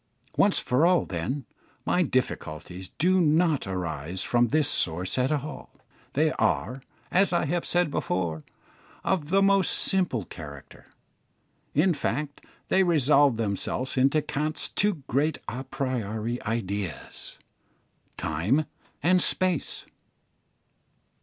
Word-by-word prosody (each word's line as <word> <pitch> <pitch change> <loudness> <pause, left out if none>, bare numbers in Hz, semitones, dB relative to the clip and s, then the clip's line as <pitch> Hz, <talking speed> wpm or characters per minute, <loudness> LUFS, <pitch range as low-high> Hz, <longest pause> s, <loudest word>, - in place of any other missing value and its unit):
Once 200 -1 +4
for 125 +5 +1
all, 175 0 +4
then, 100 - -3 0.4
my 180 - +2
difficulties 90 - -2
do 185 +4 +3
not 160 - +2
arise 90 -1 -3
from 120 +2 +3
this 150 +3 +2
source 90 - 0
at 125 +3 +1
all; 150 0 -4 0.4
they - - +2
are, 125 +5 0 0.3
as 190 0 +3
I 175 - +1
have 170 +3 -1
said 175 -3 +1
before, 85 - -2 0.6
of 155 -6 0
the 195 +2 +4
most 195 -1 +4
simple 175 - +1
character. 70 -5 -11 0.9
In 170 +5 +4
fact, 145 0 -3 0.3
they 190 - +4
resolve 145 -7 +4
themselves 115 +4 -2
into 135 +4 +3
Kant's 150 +2 -2
two 205 -8 +1
great 145 +4 +1
a 130 +3 -4
priori 120 -3 -3
ideas, 100 -6 -4 0.8
time 95 - 0 0.4
and 180 +2 +4
space. 185 -5 0
135 Hz, 115 wpm, -26 LUFS, 100-165 Hz, 0.9 s, Once